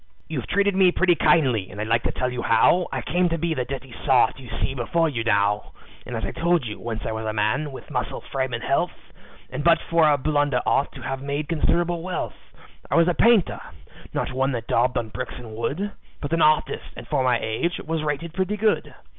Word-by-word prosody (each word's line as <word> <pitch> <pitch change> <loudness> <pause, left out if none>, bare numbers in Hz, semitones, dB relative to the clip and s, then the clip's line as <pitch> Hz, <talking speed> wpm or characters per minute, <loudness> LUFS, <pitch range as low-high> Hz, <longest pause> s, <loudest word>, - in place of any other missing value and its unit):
"You've 145 -7 -4
treated 200 +1 +2
me 190 -2 +5
pretty 180 0 +3
kindly 130 - +3
and 100 - -9
I'd 105 - -1
like 115 +1 +2
to - - +1
tell 125 0 -2
you 125 - -3
how 145 +10 +4
I - - -3
came 180 0 +1
to 165 - -1
be 170 0 0
the 130 -5 -2
dirty 135 -1 -7
sot 130 -2 +3
you 125 -3 -11
see - - -1
before 165 +6 +1
you 120 -7 -2
now. 105 -2 +1 0.3
As - - -3
I - - -3
told 170 -4 +1
you, 105 -2 -6
once 115 -1 -4
I - - -2
was 110 0 -4
a 110 - -1
man, 110 +8 0
with 135 - -10
muscle, - - -2
frame, 130 -1 -1
and 120 -1 -4
health, 170 +6 -2 0.4
And - - -4
but 170 0 +6
for 165 -2 +5
a 145 - +3
blunder 145 -2 +1
ought 140 - +2
to 135 - -10
have 135 +2 -3
made 140 +1 -3
considerable 170 +1 +1
wealth. 180 +1 -3 0.6
"I - - 0
was 170 0 +5
a 180 - +3
painter 225 -1 +3 0.5
not - - -2
one 135 +1 +1
that 115 -2 -3
daubed 125 +2 +1
on 115 -2 -2
bricks 125 +3 -5
and 115 -3 -9
wood, 175 - -2 0.3
But 145 +2 -4
an 165 - +2
artist, 155 0 +2
and - - -9
for 145 -4 +1
my 125 -2 +3
age, 110 +11 -1
was 160 0 -3
rated 155 +2 -3
pretty 190 +3 -1
good. 215 0 0
140 Hz, 225 wpm, -24 LUFS, 120-170 Hz, 0.6 s, but